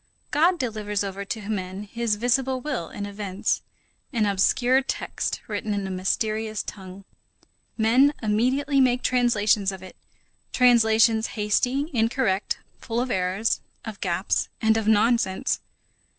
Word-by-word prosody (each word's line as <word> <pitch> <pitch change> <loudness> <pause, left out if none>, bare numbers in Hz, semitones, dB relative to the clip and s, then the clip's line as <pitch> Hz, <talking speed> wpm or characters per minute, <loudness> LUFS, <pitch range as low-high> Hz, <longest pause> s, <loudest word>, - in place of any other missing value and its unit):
God 335 +5 +3
delivers 210 - -2
over 200 0 -5
to 205 0 -5
men 190 -2 -4
his 230 +1 -1
visible 255 +4 +1
will 255 - -4
in 205 - -6
events, 205 0 -2 0.5
an 230 -5 +1
obscure 245 +6 +3
text 270 - -3
written 210 -1 -2
in 200 -1 -2
a 190 - -4
mysterious 215 +3 -1
tongue. 190 -1 -9 0.7
Men 245 +6 +4
immediately 260 +6 +1
make 250 -1 +2
translations 215 -5 +2
of 190 -1 -9
it; 185 - -11 0.6
translations 225 -2 +4
hasty, 250 - 0
incorrect, 225 -4 0 0.2
full 230 0 -3
of 250 0 -1
errors, 190 +4 0 0.3
of 220 -2 -8
gaps, 180 +1 0
and 220 0 +3
of 225 -1 -1
nonsense. 220 +1 +2
220 Hz, 130 wpm, -25 LUFS, 200-245 Hz, 0.7 s, Men